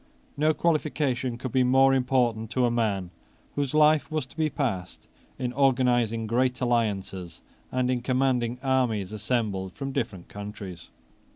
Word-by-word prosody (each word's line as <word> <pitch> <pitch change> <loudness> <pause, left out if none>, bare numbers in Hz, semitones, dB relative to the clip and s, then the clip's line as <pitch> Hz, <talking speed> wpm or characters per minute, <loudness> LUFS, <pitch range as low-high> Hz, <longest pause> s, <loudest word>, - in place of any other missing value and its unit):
No 155 +2 +3
qualification 145 -6 0
could 130 0 -5
be 130 - +3
more 135 +2 +5
important 125 -4 +1
to 125 +1 +1
a 120 - +1
man 100 -6 -1 0.4
whose 145 0 -2
life 155 0 +4
was 155 -4 -2
to 130 - -18
be 155 -1 +1
passed 115 -11 -3 0.3
in 125 -1 -3
organizing 125 -4 +2
great 125 +3 +1
alliances, 100 -8 -1 0.3
and 130 0 +1
in 125 -1 0
commanding 125 -2 +1
armies 120 -7 +1
assembled 105 -5 -1
from 135 -1 -5
different 95 -8 -3
countries. 100 -4 -8
125 Hz, 145 wpm, -26 LUFS, 110-135 Hz, 0.4 s, more